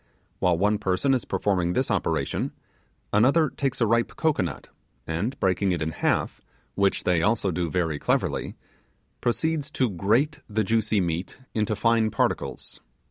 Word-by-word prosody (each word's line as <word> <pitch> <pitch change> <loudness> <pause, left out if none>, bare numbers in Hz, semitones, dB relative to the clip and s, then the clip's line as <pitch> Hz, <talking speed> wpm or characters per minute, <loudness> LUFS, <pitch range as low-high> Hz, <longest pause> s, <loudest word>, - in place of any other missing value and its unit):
While 90 -2 +2
one 105 +3 +2
person 95 +9 +1
is 125 - 0
performing 90 -4 0
this - - 0
operation, - - -1 0.6
another 140 +9 +4
takes 135 -3 -2
a - - +5
ripe 115 +2 +1
cocoanut, 145 - -1 0.4
and 105 +12 -3
breaking 95 0 +1
it 85 - -3
in 80 - -2
halves, 75 - -1 0.3
which 100 -1 +1
they 90 -2 +2
also 105 0 +1
do 85 0 -1
very 80 -3 -1
cleverly, - - -1 0.7
proceeds 155 +4 0
to 125 -4 +1
grate 120 - +1
the 110 +1 +1
juicy 110 -1 +1
meat 85 +1 -3 0.2
into 110 -1 0
fine 115 0 +2
particles. - - -2
105 Hz, 145 wpm, -25 LUFS, 90-120 Hz, 0.7 s, a